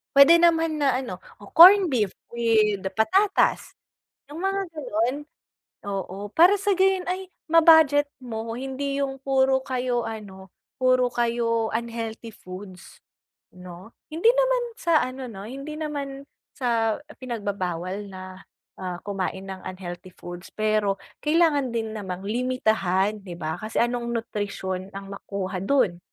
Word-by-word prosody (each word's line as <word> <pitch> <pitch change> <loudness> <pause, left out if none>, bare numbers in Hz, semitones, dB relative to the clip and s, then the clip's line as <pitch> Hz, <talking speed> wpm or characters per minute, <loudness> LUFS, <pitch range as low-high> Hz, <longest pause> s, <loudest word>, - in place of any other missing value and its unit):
Puwede 310 +5 +8
naman 325 -2 +3
na, 270 -3 +3
ano, 240 -9 -6 0.2
o 205 - -13
corned 375 +4 +9
beef 230 - +1 0.2
with 220 -4 +2 0.2
patatas, 390 - +2 0.5
'yong 295 - -9
mga 390 +1 0
gano'n. 255 -6 -1 0.7
Oo, 200 0 -5
para 345 - +6
sa 400 +1 +1
gayon 380 -1 +3
ay 375 +1 -3 0.2
ma-budget 320 -3 +6 0.2
mo. 225 -2 -5
Hindi 270 +2 -3
'yong 270 -1 -3
puro 265 0 +2
kayo, 250 -2 -1
ano, 200 -4 -8 0.3
puro 255 -1 +3
kayo 230 -2 0
unhealthy 230 0 -4
foods, 185 -2 -12 0.5
'no? 180 +2 -11 0.2
Hindi 335 +9 +4
naman - - +2 0.2
sa 335 -9 +3
ano, 255 +1 -5
'no, 205 -5 -9
hindi 275 +5 -7
naman 285 -3 -5 0.3
sa 230 -3 0 0.2
pinagbabawal 200 -5 -4
na, 185 0 -9 0.4
ah, 180 -2 -5
kumain 190 -1 -3
ng 190 -1 -7
unhealthy 185 -1 -7
foods. 175 +1 -10
Pero 215 -2 +1 0.2
kailangan 300 -4 +2
din 225 -1 -2
namang 185 -2 -6
limitahan, 215 -4 0
'di 180 -3 -8
ba? 160 -1 -3
Kasi 215 0 -4
anong 240 0 -1
nutrisyon 195 -4 -4
ang 195 0 -8
makuha 195 -1 -5
do'n, 215 -6 +2
230 Hz, 130 wpm, -25 LUFS, 195-280 Hz, 0.7 s, corned